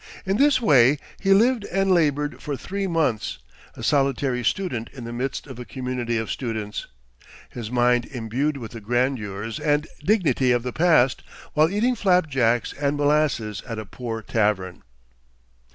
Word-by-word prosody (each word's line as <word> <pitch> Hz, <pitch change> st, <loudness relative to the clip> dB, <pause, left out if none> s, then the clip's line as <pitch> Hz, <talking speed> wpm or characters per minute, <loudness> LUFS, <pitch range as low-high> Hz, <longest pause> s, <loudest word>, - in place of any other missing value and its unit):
In 195 Hz, +1 st, +1 dB
this 285 Hz, +1 st, +4 dB
way 140 Hz, -, +5 dB, 0.2 s
he 195 Hz, -, +1 dB
lived 230 Hz, +3 st, +4 dB
and 195 Hz, -1 st, 0 dB
labored 150 Hz, -4 st, +1 dB
for 145 Hz, -3 st, -4 dB
three 195 Hz, +8 st, -3 dB
months, 155 Hz, -, 0 dB, 0.4 s
a -, -, -9 dB
solitary 135 Hz, -3 st, +1 dB
student 120 Hz, -, -1 dB
in 130 Hz, -3 st, -9 dB
the 115 Hz, 0 st, -6 dB
midst 130 Hz, +3 st, -3 dB
of 130 Hz, -4 st, -10 dB
a -, -, -5 dB
community 125 Hz, -2 st, -3 dB
of 110 Hz, 0 st, -3 dB
students; 110 Hz, -5 st, -4 dB, 0.6 s
his 115 Hz, -3 st, -6 dB
mind 120 Hz, 0 st, +2 dB
imbued 130 Hz, +4 st, -2 dB
with 115 Hz, -5 st, -8 dB
the 115 Hz, -, -8 dB
grandeurs 115 Hz, -3 st, -2 dB
and 150 Hz, 0 st, +1 dB, 0.2 s
dignity 170 Hz, -, +2 dB
of 120 Hz, -1 st, +1 dB
the 125 Hz, -1 st, -4 dB
past, 155 Hz, -7 st, +3 dB, 0.3 s
while 155 Hz, +2 st, +4 dB
eating 220 Hz, +6 st, +1 dB
flapjacks 145 Hz, -, +2 dB
and 145 Hz, 0 st, -1 dB
molasses 145 Hz, -9 st, +1 dB
at 115 Hz, -, -5 dB
a 110 Hz, -, -5 dB
poor 115 Hz, +1 st, -6 dB
tavern. 105 Hz, -5 st, 0 dB
130 Hz, 155 wpm, -24 LUFS, 115-155 Hz, 0.6 s, way